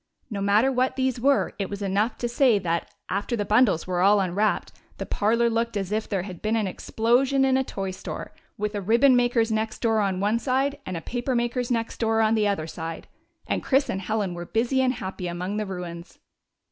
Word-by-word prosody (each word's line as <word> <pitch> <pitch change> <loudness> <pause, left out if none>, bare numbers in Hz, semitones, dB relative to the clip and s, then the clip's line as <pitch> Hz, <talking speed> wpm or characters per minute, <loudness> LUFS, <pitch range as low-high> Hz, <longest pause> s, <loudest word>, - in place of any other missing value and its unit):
No 200 -2 -3
matter 210 +6 +3
what 255 0 +1
these 260 -2 -1
were; 275 +2 +2
it 195 -1 -3
is 200 0 -4
enough 200 +4 0
to 240 - -2
say 240 -1 +3
that, 170 -3 -2 0.2
after 200 +5 -2
the 205 -3 -2
bundles 210 -6 +3
were 180 -1 -1
all 200 +2 +5
unwrapped, 195 +3 0 0.3
the - - -4
parlor 230 +3 +1
looked 230 -1 0
as 195 -1 -3
if 215 +1 -1
there 195 -4 -1
had 185 -3 -8
been 215 +1 0
an 220 -2 +1
explosion 245 +8 +1
in 265 -1 +3
a 265 - +2
toystore, 195 -6 -6 0.3
with 210 +1 -2
a 205 - -2
ribbon 235 +7 +4
maker's 240 -2 +2
next 220 0 -1
door 225 -2 +2
on 195 -3 0
one 210 +4 +1
side 275 +3 0
and 185 -2 -3
a - - -5
paper 245 +4 -2
makers 240 +1 -1
next 230 -2 -2
door 225 -1 +1
on 220 0 +3
the 215 -2 +2
other 195 -6 -1
side; 165 0 -6 0.4
and - - -1
Chris 270 +1 +2
and 190 - -3
Helen 200 -1 -1
were 175 0 -6
busy 245 +4 +1
and 255 -1 +2
happy 190 -5 -5
among 180 +4 -3
the 215 -1 -2
ruins. 175 -2 -7
215 Hz, 215 wpm, -25 LUFS, 195-240 Hz, 0.4 s, all